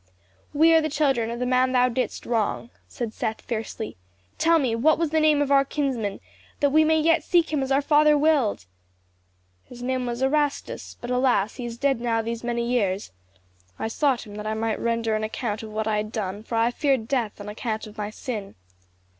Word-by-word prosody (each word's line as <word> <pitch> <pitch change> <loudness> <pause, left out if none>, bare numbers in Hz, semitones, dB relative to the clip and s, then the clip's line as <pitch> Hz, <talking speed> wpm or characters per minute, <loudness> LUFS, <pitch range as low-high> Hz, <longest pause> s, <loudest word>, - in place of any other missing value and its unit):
"We 320 +3 +5
are 325 - +6
the 310 - -1
children 270 -6 +1
of 235 - -4
the 250 - -1
man 255 +1 +2
thou 250 0 +4
didst 250 +1 -3
wrong," 230 0 -1 0.2
said 230 -3 -5
Seth 220 - -3
fiercely. 225 - -5 0.4
"Tell 330 0 +4
me, 260 -7 +1
what 305 +7 +3
was 330 -3 -1
the 315 - +3
name 305 -2 +4
of 280 - -3
our 275 -1 +6
kinsman, 260 -8 -2 0.4
that 285 -1 +2
we 310 +2 +5
may 315 0 +3
yet 325 0 +3
seek 335 -2 +2
him 295 - +1
as 265 0 -2
our 275 +1 +3
father 300 +1 +5
willed?" 290 - +2 1.0
"His 245 0 -11
name 255 0 -1
was 240 +2 -2
Erastus; 290 +1 -1
but, 245 - -5
alas, 250 -5 +1
he 245 - -5
is 235 0 -7
dead 270 -2 +1
now 230 -2 0
these 230 +1 -4
many 235 0 -1
years. 205 - 0 0.7
I 220 - -3
sought 265 0 0
him 205 - -11
that 210 0 -5
I 215 - -1
might 225 0 -1
render 230 -1 0
an 215 - -2
account 215 0 -3
of 220 - -8
what 215 0 -3
I 215 -1 +1
had 215 0 -3
done, 205 -3 -4
for 225 +1 -5
I 230 +1 +3
feared 265 -4 0
death 235 -7 -1
on 205 - -8
account 220 +1 -4
of 215 0 -12
my 210 0 -2
sin. 215 -2 -6
245 Hz, 215 wpm, -25 LUFS, 220-285 Hz, 1.0 s, are